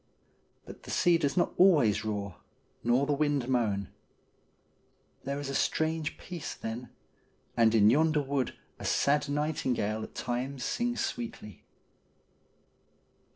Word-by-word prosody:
But -, -, -11 dB
the -, -, -13 dB
sea 175 Hz, -2 st, +3 dB
does 145 Hz, +1 st, -1 dB
not 175 Hz, -, +2 dB
always 145 Hz, -, +5 dB
roar, 100 Hz, -4 st, -4 dB, 0.5 s
nor 120 Hz, +4 st, +3 dB
the 145 Hz, -, +1 dB
wind 145 Hz, -3 st, 0 dB
moan. 110 Hz, -7 st, 0 dB, 1.4 s
There 140 Hz, +1 st, -2 dB
is 145 Hz, -, -5 dB
a 135 Hz, -, -3 dB
strange 160 Hz, +2 st, 0 dB
peace 175 Hz, -5 st, -6 dB
then, 115 Hz, +3 st, -6 dB, 0.7 s
and 115 Hz, -1 st, +4 dB
in 105 Hz, 0 st, +6 dB
yonder 155 Hz, +2 st, +3 dB
wood 135 Hz, -2 st, -1 dB, 0.2 s
a -, -, -8 dB
sad 145 Hz, 0 st, +2 dB
nightingale 130 Hz, -8 st, -1 dB
at -, -, -8 dB
times 125 Hz, +1 st, -3 dB
sings 240 Hz, 0 st, -1 dB
sweetly. 230 Hz, -, -7 dB
140 Hz, 125 wpm, -30 LUFS, 115-155 Hz, 1.4 s, in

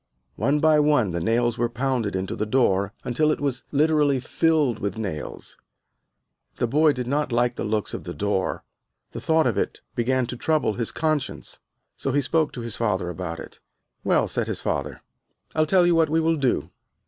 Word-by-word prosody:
One 145 Hz, +2 st, +2 dB
by 155 Hz, 0 st, +5 dB
one 145 Hz, -9 st, +3 dB
the 85 Hz, -, -2 dB
nails 120 Hz, +5 st, +1 dB
were 120 Hz, -1 st, +1 dB
pounded 120 Hz, -4 st, -1 dB
into 95 Hz, 0 st, -2 dB
the 105 Hz, -, -2 dB
door, 100 Hz, -5 st, +2 dB
until 155 Hz, +5 st, +1 dB
it -, -, -1 dB
was 135 Hz, -4 st, -2 dB
literally 150 Hz, -2 st, +3 dB
filled 145 Hz, -3 st, +1 dB
with 100 Hz, 0 st, -3 dB
nails. 95 Hz, -9 st, -6 dB, 1.0 s
The -, -, 0 dB
boy 150 Hz, +6 st, +4 dB
did 125 Hz, -2 st, -4 dB
not 140 Hz, +2 st, -1 dB
like 120 Hz, +1 st, +2 dB
the -, -, -4 dB
looks 105 Hz, -2 st, -1 dB
of -, -, -5 dB
the -, -, -6 dB
door, 95 Hz, +2 st, -1 dB, 0.5 s
the -, -, -7 dB
thought 160 Hz, 0 st, +3 dB
of 110 Hz, -5 st, +1 dB
it -, -, -3 dB
began 130 Hz, +2 st, +1 dB
to 125 Hz, -, -5 dB
trouble 150 Hz, -3 st, +1 dB
his 115 Hz, +1 st, -3 dB
conscience. 155 Hz, -, -2 dB, 0.4 s
So 135 Hz, -, -2 dB
he 145 Hz, -, +3 dB
spoke 155 Hz, +3 st, +1 dB
to 125 Hz, -, -6 dB
his 115 Hz, -2 st, -4 dB
father 95 Hz, -6 st, -1 dB
about 85 Hz, -1 st, -5 dB
it. -, -, -11 dB, 0.4 s
"Well," -, -, +2 dB
said -, -, -2 dB
his -, -, -3 dB
father, -, -, -3 dB, 0.5 s
"I'll 155 Hz, 0 st, +2 dB
tell 180 Hz, +2 st, +4 dB
you 175 Hz, -, +4 dB
what 165 Hz, -2 st, +3 dB
we 160 Hz, +2 st, +2 dB
will 165 Hz, 0 st, +2 dB
do. 135 Hz, -4 st, 0 dB
125 Hz, 195 wpm, -24 LUFS, 110-150 Hz, 1.0 s, by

